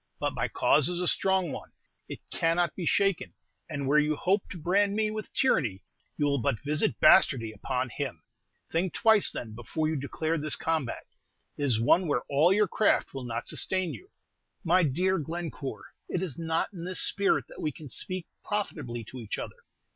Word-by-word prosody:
But - - -1
my - - -1
cause 150 +2 +3
is 175 -1 -1
a 180 - +1
strong 190 -4 +2
one, - - -8 0.4
it - - -7
cannot 170 +1 +1
be 175 -4 -3
shaken; 195 -3 +1 0.3
and 140 -3 -3
where 150 +2 +5
you 150 0 +1
hope 190 +6 0
to - - -7
brand 200 +5 +2
me 215 0 +1
with 215 -1 -6
tyranny, 125 - +1 0.3
you 145 - +1
will 140 -1 +1
but 110 -1 0
visit 150 -5 0
bastardy 115 -6 +5
upon 125 +4 -2
him. 140 +1 -5 0.5
Think 175 +2 0
twice, 220 -2 +5
then, 110 -3 -6
before 120 +8 -2
you 160 - -1
declare 155 +3 -2
this 155 +1 -1
combat. 160 -7 -2 0.5
It 145 - -2
is 120 -5 +3
one 170 +10 +4
where 135 -5 0
all 150 +6 +4
your 210 +1 +4
craft 210 +3 +2
will 135 -2 -5
not 115 0 -4
sustain 185 -2 0
you." 380 - -11 0.5
"My 180 +1 +4
dear 180 +5 +1
Glencore, 160 -3 -5 0.3
it 180 - -1
is 165 -9 -3
not 165 +4 -1
in 170 -3 -7
this 185 +1 -3
spirit 200 0 +2
that - - -10
we 155 - -1
can 150 +2 -11
speak 185 +7 -4 0.2
profitably 125 - -3
to 125 +4 -10
each 110 -4 -4
other. - - -8
160 Hz, 190 wpm, -28 LUFS, 135-185 Hz, 0.5 s, where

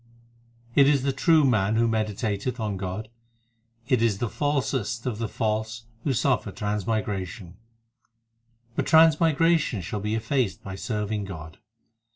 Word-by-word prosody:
It 140 +1 +6
is 140 -2 +3
the 135 -1 0
true 155 +3 +4
man 110 -4 +2
who 115 +1 +3
meditateth 110 +1 -2
on 105 -3 -2
God; 95 +3 -5 0.8
It 130 -3 +2
is 115 -4 +2
the 120 +2 -2
falsest 130 -6 -1
of 115 -4 -2
the 115 - -1
false 110 +1 -2 0.2
who 145 - 0
suffer 120 - +1
transmigration; 105 -3 -3 1.2
But - - -1
transmigration 160 - +4
shall 105 +4 -4
be 105 +2 -2
effaced 115 -1 -1
by 95 - -6
serving 105 0 -3
God. 80 -4 -9
110 Hz, 135 wpm, -25 LUFS, 105-130 Hz, 1.2 s, It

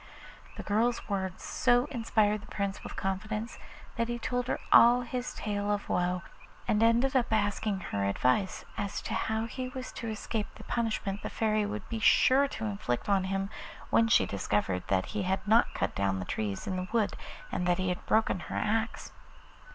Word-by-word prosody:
The - - -5
girl's 230 +4 +1
words 190 -2 -3
so 245 0 +3
inspired 215 -4 +1
the 210 - -13
Prince 200 -1 -3
with - - -7
confidence 210 +4 -3 0.4
that 230 0 +1
he 240 0 -2
told 245 +1 -2
her - - -1
all 240 +1 +8
his 245 +1 -4
tale 205 -1 -2
of 205 0 -1
woe, 180 0 0 0.4
and 210 - +2
ended 235 +4 +3
up 250 -2 +3
by 220 - +3
asking 205 -1 -1
her 100 - -2
advice 125 - +1
as 205 -1 -2
to - - -4
how 220 0 0
he 255 +2 -5
was 255 0 -6
to 230 - -5
escape 215 0 -3
the - - -11
punishment 215 -4 -2
the - - -4
Fairy 215 -2 +1
would 210 -1 -5
be 230 - -3
sure 265 +6 +5
to 225 -5 -5
inflict 200 - -2
on 195 -2 +3
him 195 +1 -2 0.4
when 225 - +5
she 225 - +5
discovered 100 -2 -1
that 95 -1 +1
he 210 - -3
had 190 +3 -1
not 225 +3 +4
cut - - -1
down 100 -1 0
the 95 - -4
trees 100 -1 -3
in 185 - -2
the 185 0 -3
wood 225 -3 +1 0.4
and 180 - -1
that 175 0 +3
he 185 0 0
had 180 - -3
broken 220 -4 +2
her 160 - -7
axe. 220 +1 -1
210 Hz, 195 wpm, -30 LUFS, 190-230 Hz, 0.4 s, all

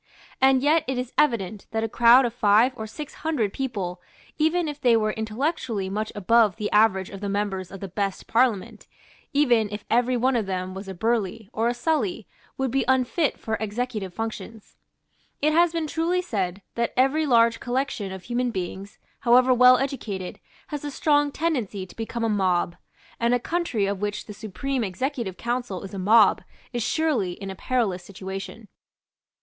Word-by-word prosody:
And 265 0 +5
yet 310 +2 +4
it 265 -1 -1
is 250 -1 -4
evident 220 -8 0
that 225 0 -2
a - - 0
crowd 240 +3 +6
of 235 - -2
five 220 +2 +4
or 220 -2 -6
six 295 +7 -8
hundred 265 -11 0
people, 195 -9 -4 0.4
even 320 +2 +2
if 295 -1 -6
they 240 -3 +5
were 215 -1 +1
intellectually 220 - -2
much 215 +2 -2
above 215 +1 +3
the 210 -2 -3
average 210 -3 +3
of 195 -1 -9
the 200 - -3
members 195 -2 -2
of 195 - -10
the 195 - -4
best 195 +1 -3
Parliament, 230 -5 0 0.4
even 245 -8 +3
if 210 0 -6
every 245 +2 +3
one 255 +2 +2
of 220 -4 0
them 185 -1 -3
were 190 +1 -6
a 190 - -6
Burleigh, 220 0 -1
or 225 +2 +1
a 240 - 0
Sully, 240 - -1 0.3
would 265 -2 -1
be 270 +1 +1
unfit 260 +4 +1
for 220 0 -2
executive 220 -2 -3
functions. 225 +1 -7 0.6
It 305 +1 +2
has 340 +1 +4
been 330 -1 -2
truly 335 +4 0
said 195 - -3
that 235 0 -1
every 280 +4 +3
large 230 -2 +4
collection 245 -5 -2
of 190 -1 -8
human 245 +1 -1
beings, 190 -1 -5 0.2
however 250 +1 +5
well 250 +1 +7
educated, 215 -9 -4 0.3
has 295 -2 -5
a 295 - -3
strong 290 0 +2
tendency 245 - -2
to 180 - -16
become 230 +1 -4
a - - +2
mob; 185 -5 +1 0.4
and 235 +1 +3
a - - 0
country 330 - -1
of 200 0 -2
which 205 0 -3
the 210 - -8
Supreme 230 +6 -3
Executive 215 0 -3
Council 240 -6 -3
is 195 - -9
a 195 - -4
mob 215 +3 +5 0.3
is 240 - -1
surely 265 - 0
in 195 +1 -7
a - - -7
perilous 200 -5 -1
situation. 195 +3 -8
230 Hz, 180 wpm, -25 LUFS, 200-260 Hz, 0.6 s, well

